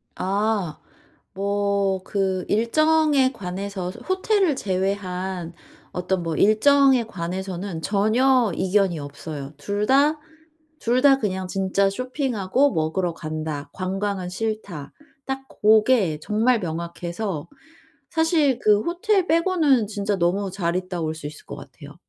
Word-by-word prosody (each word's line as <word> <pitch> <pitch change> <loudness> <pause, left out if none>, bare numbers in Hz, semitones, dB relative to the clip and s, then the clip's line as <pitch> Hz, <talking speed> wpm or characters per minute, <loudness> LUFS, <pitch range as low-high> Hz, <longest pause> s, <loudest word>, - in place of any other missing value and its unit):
아. 195 -3 -1 0.5
뭐 200 -1 0
그 190 -2 -1
일정에 290 +4 +3
관해서 190 -2 -5
호 375 - -3
호텔을 380 -6 +2
제외한 185 -2 -2 0.4
어떤 180 0 -1
뭐 165 -1 -2
일정에 265 - +5
관해서는 185 -2 -5
전혀 225 +5 +3
이견이 190 -2 +1
없어요. 145 0 -7
2 200 +8 -2
다, 290 +3 +4 0.6
2 245 +2 +1
다 275 -1 +6
그냥 190 -4 -2
진짜 195 +1 +1
"쇼핑하고 255 +1 0
먹으러 165 +3 -1
간다. 155 -2 -5
관광은 190 0 -3
싫다." 195 -7 -4 0.3
딱 270 0 -4
고게 215 -6 +3
정말 225 +6 +2
명확해서 170 0 -4 0.6
사실 320 -5 +2
그 210 0 +4
호텔 360 - +1
빼고는 320 - +3
진짜 205 -1 -2
너무 190 +3 0
잘 175 -2 -1
있다 185 -1 -3
올 160 0 -2
수 155 -2 -7
있을 150 +1 -11
것 - - -7
같아요. - - -12
200 Hz, 235 characters per minute, -23 LUFS, 180-255 Hz, 0.6 s, 다